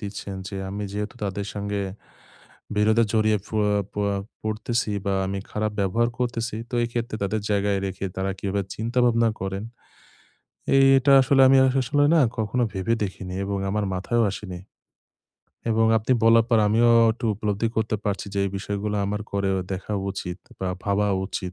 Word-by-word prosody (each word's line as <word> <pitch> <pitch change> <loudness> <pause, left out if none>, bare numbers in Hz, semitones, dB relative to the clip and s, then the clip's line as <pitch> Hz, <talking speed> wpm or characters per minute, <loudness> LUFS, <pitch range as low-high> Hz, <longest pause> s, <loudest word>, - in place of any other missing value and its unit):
দিচ্ছেন 100 -1 -6
যে, 100 - -6
আমি 100 +1 -4
যেহেতু 105 +4 -4
তাদের 100 +1 -3
সঙ্গে 100 0 -2 1.0
বিরোধে 110 +2 +4
জড়িয়ে 110 -1 +3
ফুয়া 105 -1 +1 0.2
পুয়া 100 -1 -1 0.3
পড়তেছি 110 +1 -1 0.2
বা 100 - +1
আমি 95 +1 -3
খারাপ 105 0 -1
ব্যবহার 100 +5 +2
করতেছি। 120 -3 -2
তো 130 - -18
এইক্ষেত্রে 120 -1 -3
তাদের 105 +2 -1
জায়গায় 100 -1 +1
রেখে 95 +1 -4
তারা 95 +1 -1
কিভাবে 100 0 -1
চিন্তাভাবনা 115 0 +2
করেন। 95 +1 -3 1.3
এটা 135 +2 +3
আসলে 135 +1 +4
আমি 135 - +6
আসলে 135 +2 +2
না - - +6 0.2
কখনো 110 +3 0
ভেবে 95 +4 0
দেখিনি 95 -1 -5
এবং 100 0 -2
আমার 105 +1 0
মাথায়ও 115 +5 0
আসেনি 95 -4 -7 1.1
এবং 115 0 +3
আপনি 110 +4 0
বলার 115 0 +6
পর 115 -2 +4
আমিও 115 +2 +4 0.2
একটু 120 +1 -8
উপলব্ধি 105 +2 -1
করতে 110 -1 0
পারছি। 100 0 -2
যে - - -1
এই 100 - -1
বিষয়গুলো 100 +1 -3
আমার 105 +1 -2
করেও 100 -1 0 0.2
দেখা 95 +3 -5 0.2
উচিত 90 -2 -5 0.2
বা 95 - -2 0.2
ভাবা 100 +1 +1 0.2
উচিত। 90 -1 -5
105 Hz, 155 wpm, -24 LUFS, 100-115 Hz, 1.3 s, আমি